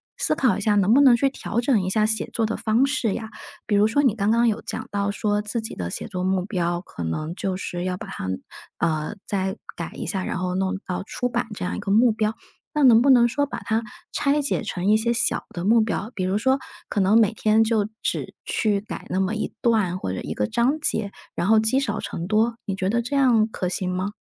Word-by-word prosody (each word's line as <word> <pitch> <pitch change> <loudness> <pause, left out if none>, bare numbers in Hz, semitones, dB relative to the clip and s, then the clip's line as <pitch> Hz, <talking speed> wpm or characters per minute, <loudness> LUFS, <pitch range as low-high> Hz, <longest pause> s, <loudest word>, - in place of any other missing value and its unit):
思 - - +1
考 260 -4 +2
一 - - -4
下 210 0 +2
能 205 +2 +4
不 280 - +6
能 260 -4 +7
去 275 - +2
调 235 -3 -3
整 240 -4 +2
一 185 - -2
下 215 +2 +2
写 220 0 0
作 225 - +1
的 225 - -2
方 225 +4 +2
式 275 -7 0
呀？ 220 -2 -5 0.4
比 210 - +1
如 205 +1 +5
说 260 +6 +2
你 235 -5 +3
刚 210 0 +1
刚 235 +1 +3
有 225 0 0
讲 - - -5
到 200 0 0
说 205 0 0
自 215 +3 -3
己 220 - -5
的 85 -1 -4
写 - - -5
作 185 -4 -4
目 185 -1 0
标， 175 -4 -1
可 85 - -8
能 155 - -3
就 190 -2 -2
是 175 -2 -4
要 180 0 -2
把 - - -8
它， - - -6 0.5
呃， 155 +4 -1
再 190 0 -2 0.2
改 170 - -5
一 - - -5
下， 185 +2 -2
然 - - -3
后 180 0 -2
弄 190 +1 0
到 180 +1 -3
出 245 +4 -3
版 240 -1 -2
这 - - -4
样 180 - -2
一 - - -4
个 195 - -2
目 230 +2 +5
标。 215 0 0 0.4
那 300 - +2
能 240 -2 +7
不 275 - +5
能 240 -2 +6
说 285 +4 0
把 285 - -6
它 225 +1 -1 0.3
拆 290 +1 +1
解 280 - -1
成 195 -2 -3
一 215 - +6
些 235 +2 0
小 240 +1 +1
的 175 - -4
目 225 +4 +5
标？ 215 +1 -2
比 185 - -2
如 190 +3 0
说 265 +4 +2 0.3
可 205 - -1
能 200 +4 +5
每 220 -1 +4
天 220 0 +3
就 220 -2 +1
只 - - -2
去 205 -3 0
改 215 - -8
那 185 - 0
么 190 +3 0
一 215 - -3
段， 210 -7 +2
或 95 - -3
者 95 - -4
一 - - -4
个 105 - -1
章 260 +6 +1
节， 220 -9 0 0.2
然 175 - -1
后 220 0 +6
积 220 +5 +2
少 215 -6 -2
成 170 - -5
多， 225 +3 +2
你 195 -3 -2
觉 190 0 -1
得 235 +3 +1
这 265 +4 -3
样 240 -6 +4
可 185 -4 -3
行 180 0 -2
吗？ 185 +3 -2
215 Hz, 270 characters per minute, -23 LUFS, 190-235 Hz, 0.5 s, 能